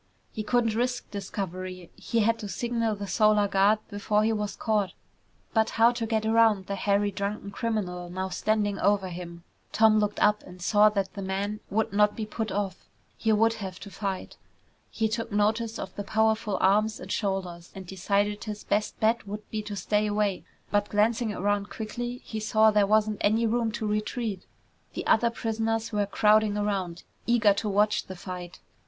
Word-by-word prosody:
He 215 - -3
couldn't 230 0 +1
risk 245 +2 -2
discovery. 185 -3 -5
He 230 - -1
had 230 +2 +2
to 210 - -5
signal 230 -1 -1
the 200 0 -5
Solar 210 0 +3
Guard 200 +2 +4
before 210 0 0
he 225 +1 +2
was 210 -1 -3
caught. 210 -4 0 0.6
But 220 -1 +3
how 230 +1 +6
to 235 -2 -3
get 220 -1 0
around 220 -3 +4
the 200 - -4
hairy, 200 +1 +1
drunken 200 +1 -4
criminal 190 -5 -3
now 185 +1 -3
standing 205 +1 0
over 195 -1 +2
him? 170 -1 -8 0.3
Tom 220 -1 +5
looked 210 -1 -1
up 210 0 +3
and 180 0 -13
saw 210 +4 +5
that 195 -2 -2
the 200 - -6
man 195 +2 -2
would 215 +1 0
not 210 0 +3
be 220 - -3
put 215 0 -4
off. 195 -2 -3 0.3
He 225 - 0
would 225 +1 +4
have 190 -1 -6
to 200 - -9
fight. 195 -2 -4 0.5
He 220 - 0
took 230 +1 -3
notice 215 +2 +1
of - - -7
the 205 - -4
powerful 220 -1 +1
arms 210 +3 +2
and - - -8
shoulders, 185 -4 -3
and 190 -1 -8
decided 200 +3 -1
his 210 -1 -6
best 210 +1 -1
bet 220 0 +1
would 210 +1 -6
be 215 - -2
to 210 -1 -6
stay 210 +2 0
away, 205 -2 0 0.3
but 205 0 +1
glancing 220 +2 +1
around 205 0 -1
quickly 240 +3 -5
he 220 - -4
saw 215 0 +4
there 210 -1 +3
wasn't 215 0 +2
any 220 +3 +3
room 230 0 +1
to 220 0 -3
retreat. 210 -1 -2 0.5
The - - -4
other 235 +1 +4
prisoners 225 0 -2
were 205 -2 0
crowding 210 0 +3
around, 195 -4 -2 0.2
eager 230 -4 +4
to 210 +1 -2
watch 210 +1 +2
the 185 - -7
fight. 180 -1 -7
210 Hz, 185 wpm, -27 LUFS, 200-220 Hz, 0.6 s, how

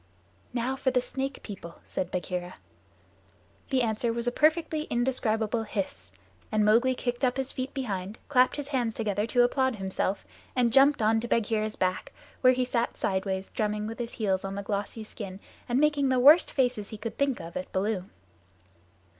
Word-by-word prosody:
"Now 250 +2 -1
for 265 - 0
the 255 -1 +2
Snake 270 +2 -3
People," 170 -5 -8
said 180 - -3
Bagheera. 180 0 -3 1.1
The 260 -3 +2
answer 230 +1 0
was 235 +1 -3
a 245 - +1
perfectly 315 +2 +2
indescribable 230 -2 0
hiss, 195 - -4 0.4
and 215 -1 +3
Mowgli 240 +5 +4
kicked 245 +1 -3
up 250 0 +2
his 265 0 -2
feet 260 0 -4
behind, 205 -5 -3
clapped 255 -3 +4
his 290 -1 -5
hands 245 -6 0
together 210 -1 -1
to 245 +1 +4
applaud 260 0 +2
himself, 195 0 -2 0.3
and 240 -3 +2
jumped 275 -2 +6
on 220 +1 +4
to 235 - -4
Bagheera's 215 -2 0
back, 185 0 -1 0.3
where 255 -1 +6
he 255 0 0
sat 240 -1 -1
sideways, 190 0 -1
drumming 210 -1 -1
with 225 +3 -6
his 235 -1 -4
heels 195 -4 0
on 195 0 -4
the 200 - -4
glossy 205 +2 -3
skin 195 -3 -8 0.3
and 245 +2 +2
making 295 -2 +3
the 260 - +3
worst 295 +7 +7
faces 245 -6 0
he 215 - -7
could 225 +1 -6
think 280 -3 +1
of 165 +1 -9
at 185 - -5
Baloo. 190 -1 -1
230 Hz, 180 wpm, -28 LUFS, 205-255 Hz, 1.1 s, worst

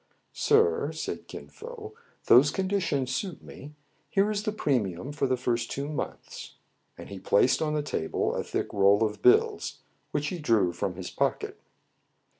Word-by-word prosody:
"Sir," 450 +1 +3
said - - -5
Kin - - -9
Fo, 450 -2 -10 0.3
"those 135 +4 +7
conditions 185 -9 -1
suit 190 -4 -4
me. 150 +2 -11 0.3
Here 200 +2 +2
is 205 -1 -1
the 215 0 -2
premium 125 - -1
for 145 -2 -1
the 130 0 +1
first 120 -2 -1
two 140 +1 -3
months." 150 -1 -6 0.4
And - - -10
he 100 -1 -7
placed 100 +6 +3
on 155 -1 0
the 150 - 0
table 80 - -1
a - - -2
thick - - -3
roll 100 +2 +4
of 105 -1 -2
bills, 125 - +3 0.3
which 145 0 -1
he 180 - -5
drew 110 - +2
from 90 +1 -3
his 90 -1 -7
pocket. - - -1
140 Hz, 165 wpm, -28 LUFS, -, 0.4 s, those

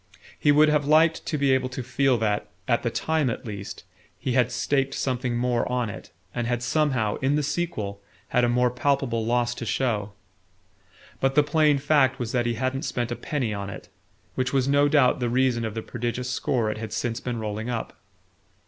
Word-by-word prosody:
He 145 - +4
would 150 +1 +6
have 150 -1 +2
liked 160 +2 +4
to 155 - -1
be 140 -1 +2
able 130 -1 +2
to 130 0 -5
feel 130 +1 +2
that, 105 -2 0 0.2
at - - +2
the - - 0
time 160 -4 0
at 115 - -5
least, 100 -5 -7 0.3
he 130 - -3
had 125 -1 +2
staked 135 +2 0
something 125 -2 -1
more 120 0 0
on 125 -4 0
it, - - -10 0.2
and 120 -1 -2
had 120 0 -1
somehow, 130 -6 +1
in 135 +2 +1
the 150 - +1
sequel, 110 -12 -3 0.3
had 125 -1 +2
a 120 - +3
more 125 0 +2
palpable 125 -2 0
loss 120 +1 +1
to 120 - -7
show. 110 -4 -1 1.1
But 135 0 +1
the 150 - +6
plain 150 0 +3
fact 140 -2 +3
was 120 -2 -3
that 120 -2 +1
he 120 - 0
hadn't 130 +3 -1
spent 120 -6 -2
a - - -1
penny 125 -7 -2
on 100 -1 -4
it; 100 - -9 0.4
which 130 -1 -1
was 135 -1 +1
no 140 +1 +4
doubt 140 -4 +4
the 120 -1 0
reason 125 -1 +2
of 110 -1 -4
the 110 - -3
prodigious 120 +1 -3
score 120 -4 0
it 110 - -6
had 110 -1 -6
since 115 +1 -2
been 125 -1 -4
rolling 110 +2 -4
up. 115 -2 -4
125 Hz, 205 wpm, -25 LUFS, 115-140 Hz, 1.1 s, would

